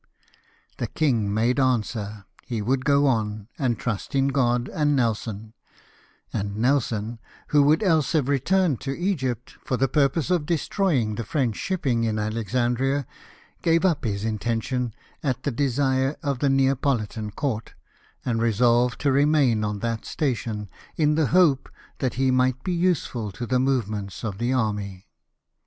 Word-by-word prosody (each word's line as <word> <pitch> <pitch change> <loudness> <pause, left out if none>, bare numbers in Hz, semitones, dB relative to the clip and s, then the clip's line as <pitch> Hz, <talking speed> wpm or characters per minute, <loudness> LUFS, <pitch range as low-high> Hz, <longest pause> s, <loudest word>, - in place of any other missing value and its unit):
The - - -1
king 115 -10 +1
made 115 +5 +1
answer 110 -5 -1 0.2
he 115 -3 -4
would 130 +5 0
go 140 0 +4
on, 110 -5 0
and 120 -5 +1
trust 120 +5 -4
in 135 0 +3
God 125 -3 +1
and 145 -1 +1
Nelson; 110 -3 -2 0.8
and 100 +1 -3
Nelson, 115 -3 0 0.3
who 150 - +5
would 150 +6 +4
else 160 -6 +2
have 150 -5 +2
returned 150 +2 +2
to 135 0 -3
Egypt, 130 - -2
for 125 - -1
the 135 +2 +2
purpose 150 +4 +1
of 165 -5 +1
destroying 160 - +1
the 115 - -4
French 120 -2 -1
shipping 135 - -1
in 110 -1 0
Alexandria, 120 +5 0 0.6
gave 165 +2 +3
up 165 -6 +2
his 105 -3 -2
intention 115 +2 -2 0.3
at 130 -3 -2
the 145 - 0
desire 135 +1 +1
of 140 -4 -1
the 140 - +2
Neapolitan 135 -5 +1
Court, 115 +1 -3 0.5
and 115 -2 0
resolved 120 +2 +3
to 140 - +2
remain 140 -5 +3
on 105 -1 -2
that 115 -1 -2
station, 115 -7 -2 0.3
in 150 -1 +3
the 155 -2 +2
hope 165 -6 +3 0.3
that 130 - -1
he 130 0 +2
might 130 0 +1
be 185 - -1
useful 170 - 0
to 120 - -5
the 125 +1 +1
movements 110 -7 -1
of 105 -3 -4
the 120 +2 0
army. 105 -6 -2
125 Hz, 150 wpm, -24 LUFS, 110-140 Hz, 0.8 s, who